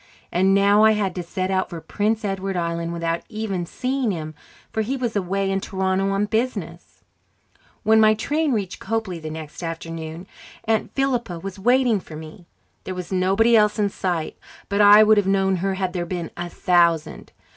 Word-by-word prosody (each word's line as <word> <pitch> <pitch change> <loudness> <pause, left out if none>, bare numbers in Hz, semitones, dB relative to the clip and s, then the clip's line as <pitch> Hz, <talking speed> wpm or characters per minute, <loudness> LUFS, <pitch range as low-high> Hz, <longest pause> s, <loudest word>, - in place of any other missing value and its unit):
And 190 +2 +3
now 200 +2 +5
I 220 0 +6
had 200 -3 -1
to 180 - -4
set 185 +2 -3
out 190 0 0
for 170 - -6
Prince 215 +5 -1
Edward 195 -1 -2
Island 170 0 -2
without 170 0 -2
even 205 -6 -3
seeing 260 +2 -1
him, 155 -5 -4 0.4
for 220 - 0
he 255 +6 -2
was 240 -4 -3
away 195 0 -1
in 195 0 0
Toronto 190 0 -1
on 195 +1 +1
business. 230 +4 -4 0.8
When 220 0 +5
my 215 0 +5
train 295 +7 0
reached 200 -6 -2
Copely 220 -6 -3
the 155 - -6
next 155 0 -8
afternoon, 165 0 -6 0.4
Aunt 220 -1 0
Philippa 245 -9 -1
was 195 +3 -7
waiting 245 0 +3
for 160 - -11
me. 160 +3 -11 0.4
There 185 - -5
was 180 0 -7
nobody 195 +5 +3
else 210 -1 +4
in 205 -1 +1
sight, 175 -5 -3 0.3
but 200 0 +1
I 205 +1 +9
would 215 0 +5
have 205 -2 +2
known 195 -1 +2
her 190 +2 -1
had 185 -2 -2
there 175 -2 -3
been 175 -2 -4
a 175 0 -5
thousand. 170 -3 +1
195 Hz, 185 wpm, -22 LUFS, 175-215 Hz, 0.8 s, I